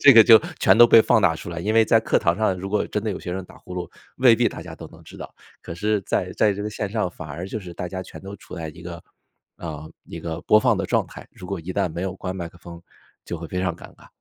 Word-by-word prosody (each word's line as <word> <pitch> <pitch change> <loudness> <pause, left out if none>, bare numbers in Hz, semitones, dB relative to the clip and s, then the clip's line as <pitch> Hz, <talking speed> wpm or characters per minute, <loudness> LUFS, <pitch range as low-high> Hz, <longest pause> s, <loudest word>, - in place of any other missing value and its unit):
这 140 - +9
个 115 -2 +9
就 115 0 +8 0.2
全 - - +5
都 120 - +10
被 115 -1 +7
放 110 - +3
大 80 - +3
出 80 - -8
来。 85 - -5
因 105 +6 -1
为 115 0 +6
在 115 - +4
课 110 - +1
堂 85 0 +1
上 105 -4 +1
如 95 +2 -6
果 105 - 0
真 105 - -3
的 110 - -2
有 95 - -4
学 90 - -6
生 95 0 -4
打 - - -16
呼 90 - -10
噜， 90 -1 -5 0.3
未 125 -3 +6
必 120 +1 +3
大 - - -9
家 - - -10
都 - - -9
能 - - -17
知 - - -13
道。 - - -9 0.3
可 85 - -8
是 105 +4 0
在 90 0 -1
在 105 -2 +3
这 100 +1 -5
个 105 - -3
线 105 -1 -4
上， 105 -3 -1
反 80 -3 -10
而 85 +5 -6
就 110 - -4
是 90 -4 -10
大 90 - -5
家 95 +1 -5
全 95 - -10
都 100 +1 -8
处 - - -12
在 80 -3 -5
一 80 +2 -11
个， 85 -1 -8 0.5
呃， 80 -2 -7
一 - - -9
个 80 0 -5
播 110 - +5
放 - - +3
的 - - -2
状 - - +1
态， - - -11
如 90 - -11
果 100 - -3
一 85 +3 -6
旦 100 -1 0
没 85 +2 -4
有 95 -1 -3
关 95 -1 -5
麦 85 -2 -5
克 85 - -19
风， 85 0 -11 0.4
就 85 - -5
会 85 0 -8
非 90 - -3
常 95 -2 -1
尴 - - -13
尬。 - - -18
95 Hz, 330 characters per minute, -23 LUFS, 85-105 Hz, 0.5 s, 都